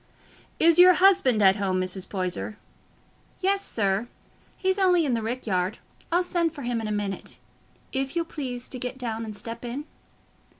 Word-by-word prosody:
"Is 335 +1 +5
your 365 0 +9
husband 360 - +4
at 190 +1 +6
home, 190 -2 0
Mrs. 185 0 -2
Poyser?" 185 +2 -2 0.8
"Yes, 390 +1 +1
sir; 200 +1 0 0.5
he's 380 0 0
only 360 -4 +4
i' - - -1
the 230 -2 0
rick 240 +4 -4
yard. 185 -1 0 0.3
I'll 350 +2 +3
send 340 -2 0
for 285 - -7
him 240 -1 -1
in 220 - -4
a - - -3
minute, 205 -2 -3 0.5
if 270 +2 -2
you'll 335 -1 0
please 255 -6 -5
to 255 - -5
get 250 +1 -4
down 230 -3 -4
and 215 -2 -6
step 230 +2 -7
in." 250 +5 -5
245 Hz, 175 wpm, -26 LUFS, 205-335 Hz, 0.8 s, your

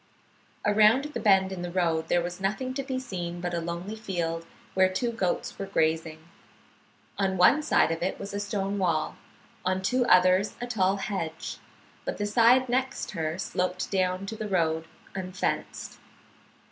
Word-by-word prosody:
Around 220 +8 +4
the - - -2
bend 190 -2 +4
in 185 -2 -5
the 175 - -3
road 165 -3 0
there 175 0 +2
was 180 +2 -5
nothing 215 +7 -1
to 275 - -2
be 265 -1 -3
seen 175 -9 -4
but 175 0 -3
a 170 - 0
lonely 170 +5 -4
field 170 -6 -3 0.3
where 185 0 +4
two 235 +6 -1
goats 195 -6 -2
were 195 - -3
grazing. 160 -2 0 0.9
On 190 -1 +1
one 220 +12 +6
side 295 - +3
of 165 - -3
it 185 - -1
was 200 0 -6
a 200 - -2
stone 200 -1 -2
wall, 165 -4 0 0.5
on 185 +1 0
two 250 +6 +2
others 185 +2 +5
a 245 - -3
tall 195 -5 +1
hedge, 190 -5 -4 0.4
but - - -3
the 205 - -1
side 235 +5 +5
next 260 +2 -1
her 160 -2 -2
sloped 185 -1 -2
down 185 0 0
to 220 - -5
the 215 -1 -5
road, 160 -3 +1 0.3
unfenced. 185 -1 -3
190 Hz, 170 wpm, -27 LUFS, 175-210 Hz, 0.9 s, one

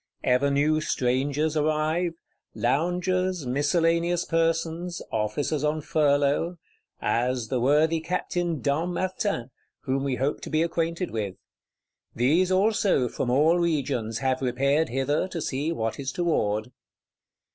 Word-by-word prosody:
Ever 125 +3 +3
new 150 +2 +2
strangers 140 +4 0
arrive; 155 +3 +1 0.4
loungers, 180 +2 0
miscellaneous 165 +6 +1
persons, 165 +1 -1
officers 110 +8 -1
on 150 +1 0
furlough,—as 140 -5 -1
the 130 - 0
worthy 150 +6 +3
Captain 175 -1 -2
Dampmartin, 175 - -1 0.3
whom 135 +1 -1
we 135 -2 0
hope 135 +4 -1
to - - -7
be 155 +1 +2
acquainted 170 +1 -2
with: 105 -4 -3 0.8
these 160 +10 +3
also, 195 - +2
from 120 - -3
all 155 +7 +4
regions, 135 -9 -1
have 130 0 0
repaired 140 +5 +1
hither, 135 +7 0
to 180 -2 -5
see 145 +1 -2
what 115 -7 -2
is 135 -1 -3
toward. 125 -10 0
150 Hz, 115 wpm, -26 LUFS, 130-170 Hz, 0.8 s, all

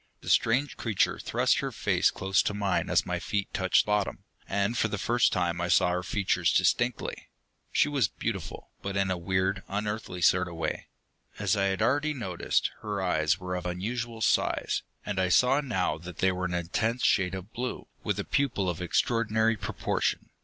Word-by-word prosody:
The - - -7
strange 130 +6 +2
creature 110 -5 0
thrust - - +1
her - - -2
face - - +2
close 95 0 +1
to 105 - -2
mine 100 -3 0
as - - +3
my - - -2
feet 100 -2 -3
touched 95 -1 +3
bottom, 105 -1 -1 0.3
and 100 +3 0
for 115 - +2
the 105 - -3
first 120 +3 +2
time 85 -1 0
I 85 - 0
saw 90 -1 +4
her 90 0 0
features 90 -3 +1
distinctly. 120 -1 0 0.4
She - - +3
was 140 -8 +2
beautiful, - - -5
but 100 0 -3
in 95 -1 +1
a 90 - 0
weird, 95 +2 0
unearthly 105 -3 -3
sort 90 0 +4
of 85 - -8
way. 80 - -3 0.5
As 100 -1 +1
I 100 -1 +1
had 95 +2 0
already 145 +5 +1
noticed, 95 -9 -1
her 105 -2 -3
eyes 85 -2 +1
were 90 -1 -5
of 90 0 -3
unusual 115 +6 -4
size, - - +1 0.2
and 100 -2 -2
I 95 -1 +2
saw 125 +9 +4
now 95 - -1
that 85 0 -9
they 95 - +3
were 90 0 -3
an 90 0 -2
intense 110 +8 -1
shade 95 -5 +2
of 95 +4 -8
blue, 125 +1 -4 0.2
with - - -1
a - - -1
pupil 125 -10 0
of 85 - -7
extraordinary 110 +4 +1
proportion. - - -2
100 Hz, 190 wpm, -28 LUFS, 90-115 Hz, 0.5 s, saw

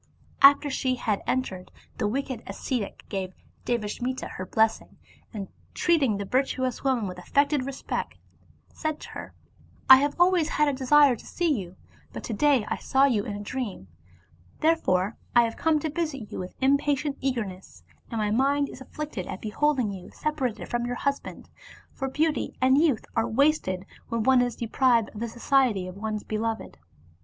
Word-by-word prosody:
After 285 +1 +7
she 260 -1 0
had 215 -5 -1
entered, 190 -8 -2 0.3
the 210 - +1
wicked 260 +1 -3
as - - -7
cetic 245 -7 -4
gave 190 -2 -4 0.3
Devasmita 240 +2 -2
her 185 - -6
blessing, 220 +2 +1 0.3
and, 200 -4 -5 0.3
treating 285 - +2
the 200 - -4
virtuous 255 +1 -1
woman 260 -5 +1
with 180 -1 -6
affected 280 - +1
respect, 275 -1 -4 0.6
said 310 -2 -3
to - - -9
her, - - -9 0.3
" - - -29
I 265 - +13
have 285 +2 0
always 350 -3 +4
had 300 - +2
a 285 - +1
desire 275 0 +5
to - - -14
see 340 -3 +1
you, 190 -7 -5 0.4
but - - -7
to 230 - -4
day 270 0 +3
I - - -2
saw 270 0 +3
you 225 -7 +1
in 205 - -4
a 205 - -6
dream, 205 - -5 0.7
therefore 230 - +2 0.2
I 240 - +7
have 230 -1 -2
come 320 -1 +2
to 315 - -2
visit 300 -8 -3
you - - -5
with 185 0 -7
impatient 280 +1 +1
eagerness; 195 - -4 0.3
and 230 - -4
my 210 -1 0
mind 280 +4 +2
is 265 - -11
afflicted 275 -8 -6
at 185 - -5
beholding 255 0 0
you 185 -2 -9
separated 275 -7 -3
from 240 0 -1
your 245 - -2
husband, 280 +2 -3 0.5
for 270 -1 -3
beauty 305 +3 0
and 260 +2 +4
youth 295 -9 +2
are 225 0 +2
wasted 230 -7 +1 0.2
when 230 -1 -1
one 260 +1 +5
is 245 -2 -1
deprived 235 -1 +2
of 210 - -10
the 235 +1 -3
society 240 -5 +2
of 185 - -8
one's 215 +1 -4
beloved." 220 - -3
255 Hz, 175 wpm, -26 LUFS, 210-280 Hz, 0.7 s, I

